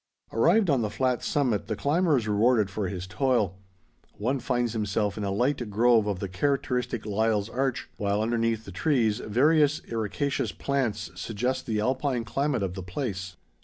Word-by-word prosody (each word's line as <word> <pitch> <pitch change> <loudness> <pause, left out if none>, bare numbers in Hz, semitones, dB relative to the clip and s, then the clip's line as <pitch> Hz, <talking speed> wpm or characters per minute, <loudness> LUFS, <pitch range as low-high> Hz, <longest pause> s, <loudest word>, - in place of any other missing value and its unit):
Arrived 180 - +4
on 140 -6 +3
the 105 - -1
flat 125 +2 0
summit, 130 -8 0
the 110 - -2
climber 155 - +2
is 115 -3 -2
rewarded 105 -1 +3
for 100 -1 -2
his 90 -1 -5
toil. 105 -3 0 0.6
One 130 +6 0
finds 120 -2 -1
himself 105 -2 -1
in 105 - -4
a 100 - -1
light 120 +3 0
grove 115 +1 +4
of 100 -3 -1
the 100 - -4
characteristic 125 +2 -1
Lyall's 105 0 0
larch, 130 +1 -1
while 100 0 0
underneath 115 -1 0
the 95 - -8
trees, 110 - +1
various 150 +6 +3
ericaceous 115 +5 -2
plants 130 -10 -1
suggest 120 +8 -3
the 110 -2 0
Alpine 130 +2 0
climate 135 -2 0
of 95 -2 -2
the 95 - -6
place. 95 -1 -4
115 Hz, 165 wpm, -27 LUFS, 105-130 Hz, 0.6 s, Arrived